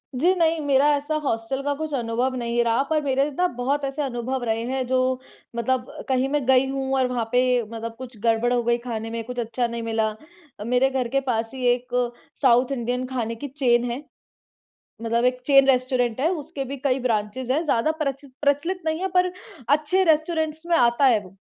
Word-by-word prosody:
जी, 340 +9 +3
नहीं 330 -2 +2
मेरा 280 +1 +4
ऐसा 290 +2 -3
हॉस्टल 230 +2 -2
का 285 0 0
कुछ 310 0 -5
अनुभव 245 +1 -1
नहीं 235 -1 0
रहा 230 +3 +2
पर 310 -1 +2
मेरे 270 -1 +2 0.2
न 360 - +4
बहुत 275 +4 -1
ऐसे 275 +2 -3
अनुभव 255 -1 -3
रहे 225 -1 0
हैं, 260 +1 -2
जो, 255 0 +1 0.4
मतलब 250 +2 -1 0.2
कहीं 260 0 +1
मैं 290 -2 0
गई 260 +1 +5
हूँ 270 0 -2
और 260 -1 +2
वहाँ 245 -2 -2
पे 250 - +4 0.2
मतलब 225 +1 -7
कुछ 250 -3 -9
गड़बड़ 230 +1 +2
हो 245 - +2
गई 235 0 +2
खाने 230 -2 -5
में, 230 0 -3
कुछ 250 +1 -6
अच्छा 240 +1 -1
नहीं 235 0 -5
मिला। 225 -1 0 0.5
अ, - - -5
मेरे 250 +4 +2
घर 260 -2 -1
के 275 +3 +1
पास 225 -2 0
ही 260 -1 -4
एक 250 0 -5 0.5
साउथ 250 -1 +4
इंडियन 250 0 -2
खाने 235 -3 -3
की 285 +5 -6
चेन 245 -3 +1
है। 255 +5 -5 1.0
मतलब 230 +1 +1
एक 250 0 +1
चेन 275 -1 +6
रेस्टोरेंट 255 -2 +1
है, 305 - +3
उसके 305 -4 -4
भी 275 +2 -5
कई 270 -1 +2
ब्रांचेज़ 240 +1 -1
हैं। 305 +5 +1
ज़्यादा 290 -1 +2
प्रच 275 0 -3 0.2
प्रचलित 295 +6 +1
नहीं 315 +1 0
है 380 - -1
पर 360 0 +3 0.4
अच्छे 305 +6 +3
रेस्टोरेंट्स 315 -1 +1
में 340 -1 +3
आता 240 0 +3
है 230 -5 +4
वो। 185 - -15
255 Hz, 205 wpm, -24 LUFS, 235-280 Hz, 1.0 s, चेन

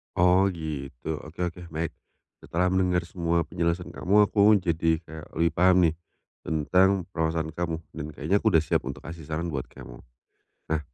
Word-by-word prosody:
Oh 90 +2 +5
gitu, 75 -4 -5
oke 80 - -14 0.2
oke 90 - -13
baik. 80 0 -3 0.5
Setelah 90 +2 0
mendengar 90 -1 +2
semua 85 -1 0
penjelasan 85 +1 -2
kamu 100 +4 +3
aku 105 0 +6
jadi 80 -1 +1
kayak 80 -1 -10
lebih 85 +1 +2
paham 90 +1 +4
nih 80 -1 +2 0.4
tentang 90 +5 +2
permasalahan 80 -1 -1
kamu 85 0 -2 0.2
dan 75 -2 -6
kayaknya 85 +8 +1
aku 110 - -1
udah 80 -7 +4
siap - - 0
untuk - - -6
kasih 80 -2 -9
saran 80 +2 -3
buat 70 -4 -4
kamu. - - -12 0.8
Nah 75 - 0
85 Hz, 165 wpm, -26 LUFS, 80-90 Hz, 0.8 s, aku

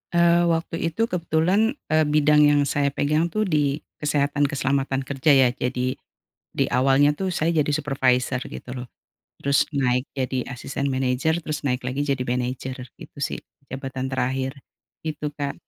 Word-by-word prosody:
Eee, 170 0 +4
waktu 165 0 -1
itu 165 +7 -1
kebetulan, 180 - +1 0.2
eee, 155 0 +4
bidang 150 0 +4
yang 145 0 +4
saya 140 0 +1
pegang 150 +3 +1
tuh 215 +5 -1
di 150 -6 0 0.2
kesehatan 145 -1 +1
keselamatan 135 -1 -1
kerja 140 +3 +1
ya, 130 -2 +6
jadi 125 0 -2 0.6
di - - +4
awalnya 135 +3 +4
tuh 190 +4 -2
saya 165 -1 0
jadi 150 - -2
supervisor 130 -3 +1
gitu - - -9
loh, 125 0 -6 0.6
terus 140 0 +3
naik 125 -1 +1
jadi 130 -1 -2
asisten 135 +2 -4
manajer 135 +6 0
terus 150 -2 -4
naik 125 -1 0
lagi 130 +3 -2
jadi 135 -3 0
manajer, 125 +1 -3 0.2
gitu - - -12
sih 140 - -2 0.3
jabatan 130 0 -5
terakhir. 130 +1 -1 0.5
Gitu 150 -2 -4
Kak. 140 -2 -3
140 Hz, 155 wpm, -24 LUFS, 130-155 Hz, 0.6 s, ya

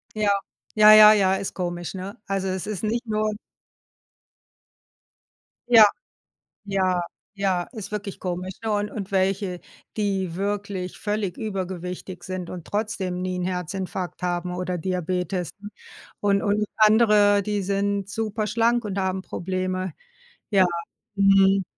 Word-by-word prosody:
Ja. 215 -1 +1 0.5
Ja, 215 0 +9
ja, 215 0 +10
ja, 195 -2 +3
ist 195 0 -4
komisch, 175 -2 -4
ne? 195 +4 -7
Also 195 -1 -1
es 185 0 -2
ist 210 -1 -4
nicht 230 +3 -1
nur 215 -1 0 2.4
Ja. 225 -2 +10 0.9
Ja, 185 -2 +1 0.3
ja, 190 -3 0
ist 215 -3 -8
wirklich 205 -2 -5
komisch, 180 +1 -4
ne? 220 - -1
Und 205 0 -1
und 200 -2 -6
welche, 190 -1 0 0.4
die 190 -4 -1
wirklich 200 -2 -3
völlig 205 -4 -2
übergewichtig 185 -3 -5
sind 185 -2 -5
und 175 -3 -8
trotzdem 200 -4 -2
nie 185 0 -2
'n - - -2
Herzinfarkt 180 0 -4
haben 180 0 -2
oder 180 0 -3
Diabetes. 180 0 -2 0.7
Und 200 -1 +2
und 210 0 +1
andere, 210 -2 +5
die 205 0 -1
sind 200 0 -1
super 215 0 -2
schlank 235 +2 +2
und 200 -1 -3
haben 190 0 -1
Probleme. 185 0 -3 0.6
Ja. 195 -3 +5 0.5
Mhm. 195 -1 +5
195 Hz, 130 wpm, -24 LUFS, 185-210 Hz, 2.4 s, ja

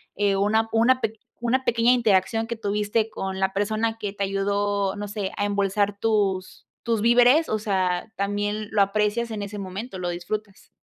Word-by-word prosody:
eh, 200 -1 +2
una 215 +3 +2
una 245 +3 +3
pe 225 0 -2 0.2
una 240 +3 +1
pequeña 230 +1 +3
interacción 225 -2 +2
que 235 +1 -4
tuviste 210 +1 -1
con 190 -3 -4
la 190 0 +1
persona 215 +3 -1
que 205 -3 -4
te 200 -1 -3
ayudó, 200 0 0
no 205 0 -5
sé, 205 -2 -4
a 205 - 0
embolsar 200 0 0
tus 200 -4 -1 0.2
tus 230 -3 0
víveres, 245 +7 +5
o 215 - +1
sea, 190 -1 -1
también 205 +1 -2
lo 210 -2 +3
aprecias 210 +3 0
en 215 -2 -4
ese 205 +1 -6
momento, 195 +3 -6
lo 175 - -2
disfrutas. 195 +4 -5
205 Hz, 175 wpm, -24 LUFS, 195-225 Hz, 0.2 s, víveres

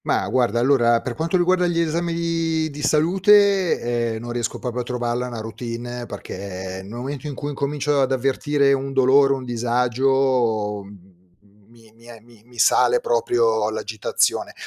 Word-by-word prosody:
Mah, - - 0
guarda, 120 -3 +1
allora 120 -2 +3
per 125 - -5
quanto 165 +6 -1
riguarda 180 0 +2
gli 170 -1 0
esami 170 +1 -1
di 165 -1 -1
di 145 +1 -8
salute, 175 - +2
ehm, - - -5
non 120 +1 -7
riesco 120 -1 -3
proprio 125 -1 -4
a - - -1
trovarla 120 0 -3
una 120 -3 -6
routine 120 +2 -6
perché 95 -1 -7
nel 95 - -12
momento 135 +5 -6
in 145 - -5
cui 145 +3 -5
incomincio 145 0 -1
ad 135 0 +1
avvertire 140 +2 +1
un 135 0 -2
dolore, 135 +1 +4
un 130 -1 -5
disagio, 120 -2 0
mhmm, 95 -2 -16 0.6
mi 115 -2 -20
mi 115 +1 -19
e 120 -1 -11
mi 115 -1 -20
mi 120 0 -19
sale 480 - +4
proprio 470 -1 +1
l'agitazione. - - -1
130 Hz, 165 wpm, -22 LUFS, 120-155 Hz, 0.6 s, dolore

